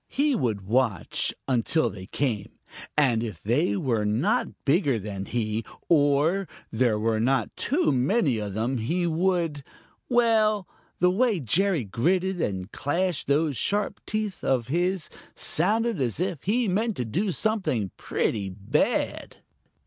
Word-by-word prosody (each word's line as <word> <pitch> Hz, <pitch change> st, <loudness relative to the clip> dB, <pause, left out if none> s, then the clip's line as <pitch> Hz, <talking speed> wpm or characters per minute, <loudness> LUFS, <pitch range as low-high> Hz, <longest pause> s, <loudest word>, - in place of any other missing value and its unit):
He 290 Hz, +1 st, +1 dB
would 115 Hz, -, -1 dB
just 95 Hz, -, -15 dB
watch 115 Hz, -5 st, +1 dB, 0.2 s
until 135 Hz, +5 st, +2 dB
they 95 Hz, -1 st, -9 dB
came, 115 Hz, -5 st, -2 dB, 0.4 s
and 125 Hz, -7 st, +3 dB
then 115 Hz, -, -2 dB
if 90 Hz, -6 st, -13 dB
they 135 Hz, -, +1 dB
were 125 Hz, -, 0 dB
not 105 Hz, +4 st, +1 dB, 0.2 s
bigger 140 Hz, -, +3 dB
than 100 Hz, -2 st, -5 dB
he, 110 Hz, -1 st, -1 dB, 0.3 s
or 155 Hz, +5 st, +3 dB, 0.2 s
there 115 Hz, -2 st, +2 dB
were 110 Hz, +1 st, 0 dB
not 130 Hz, +4 st, +1 dB
too 310 Hz, +8 st, +1 dB
many 135 Hz, -, +2 dB
of 100 Hz, -2 st, -4 dB
them, 120 Hz, +4 st, -1 dB
he 170 Hz, +11 st, 0 dB
would 170 Hz, -3 st, 0 dB, 0.5 s
well, 220 Hz, -5 st, +3 dB, 0.3 s
the 180 Hz, +1 st, +4 dB
way 220 Hz, 0 st, +2 dB
Jerry 170 Hz, -, +1 dB
gritted 175 Hz, -, 0 dB
and 95 Hz, 0 st, -2 dB
clashed 175 Hz, +4 st, -1 dB
those 145 Hz, -1 st, +1 dB
sharp 205 Hz, 0 st, -1 dB
teeth 215 Hz, -3 st, -3 dB
of 125 Hz, -3 st, 0 dB
his 175 Hz, +3 st, 0 dB, 0.3 s
sounded 215 Hz, +2 st, +1 dB
as 120 Hz, 0 st, -1 dB
if 180 Hz, -5 st, -2 dB
he 230 Hz, +4 st, +2 dB
meant 215 Hz, +3 st, 0 dB
to 125 Hz, -, -1 dB
do 185 Hz, -, -1 dB
something 180 Hz, -, -1 dB
pretty 100 Hz, -3 st, -1 dB
bad. 95 Hz, +1 st, -1 dB
145 Hz, 145 wpm, -26 LUFS, 115-190 Hz, 0.5 s, the